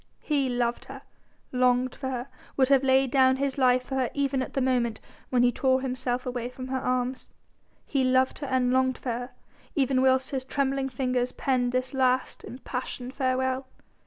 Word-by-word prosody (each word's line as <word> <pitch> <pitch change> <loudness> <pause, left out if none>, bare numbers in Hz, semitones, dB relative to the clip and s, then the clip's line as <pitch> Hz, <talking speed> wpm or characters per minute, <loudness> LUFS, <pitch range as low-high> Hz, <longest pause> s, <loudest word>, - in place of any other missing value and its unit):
He 280 -4 +1
loved 240 -1 -1
her, - - -10 0.5
longed 250 0 +2
for 265 - -5
her, 250 0 -4 0.3
would 260 -1 +3
have 275 -2 +5
laid 265 -1 +3
down 260 -1 +5
his 275 0 -2
life 250 -1 +4
for 265 - -8
her 260 -2 +1
even 275 -2 0
at - - -5
the - - +2
moment 245 -4 +1 0.3
when 245 -1 +3
he 245 - +4
tore 260 +1 +1
himself 255 -1 -2
away 245 -1 -3
from 255 0 -8
her 260 0 -1
arms. 255 0 -2 0.6
He 275 -3 0
loved 260 0 +2
her 285 - -4
and 255 -1 +1
longed 260 0 +2
for 255 - -5
her 245 +2 -4 0.5
even 265 -3 +2
whilst 260 0 +3
his 265 -2 -2
trembling 270 0 -1
fingers 250 -1 -1
penned 250 -2 0
this 255 +2 -1
last 260 -1 +1
impassioned 250 0 -6
farewell. 260 -1 0
260 Hz, 185 wpm, -27 LUFS, 250-265 Hz, 0.6 s, have